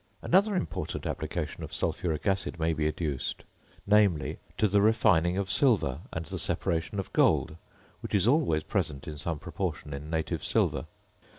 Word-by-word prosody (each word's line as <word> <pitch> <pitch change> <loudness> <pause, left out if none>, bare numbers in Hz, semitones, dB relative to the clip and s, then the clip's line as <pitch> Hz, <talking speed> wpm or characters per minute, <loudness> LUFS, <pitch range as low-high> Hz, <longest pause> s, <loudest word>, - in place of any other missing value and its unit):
Another 200 +3 +3
important 180 - -3
application - - -3
of - - -7
sulphuric 80 -4 -2
acid 95 -3 0
may 80 0 +1
be 75 0 0
adduced; 75 -3 -3 0.4
namely, 100 -6 +3 0.2
to 110 - +3
the 100 +1 +3
refining 95 -5 +4
of 95 -2 -1
silver 100 - +2
and 80 0 -4
the - - -4
separation 85 +4 -1
of 95 - -4
gold, 80 - +3 0.4
which - - -3
is 100 +1 +3
always 125 - +3
present 70 -2 -2
in 75 - -5
some 75 +2 -3
proportion 75 0 -4
in 70 +2 -6
native 80 -1 -2
silver. - - +1
85 Hz, 160 wpm, -29 LUFS, 80-105 Hz, 0.4 s, refining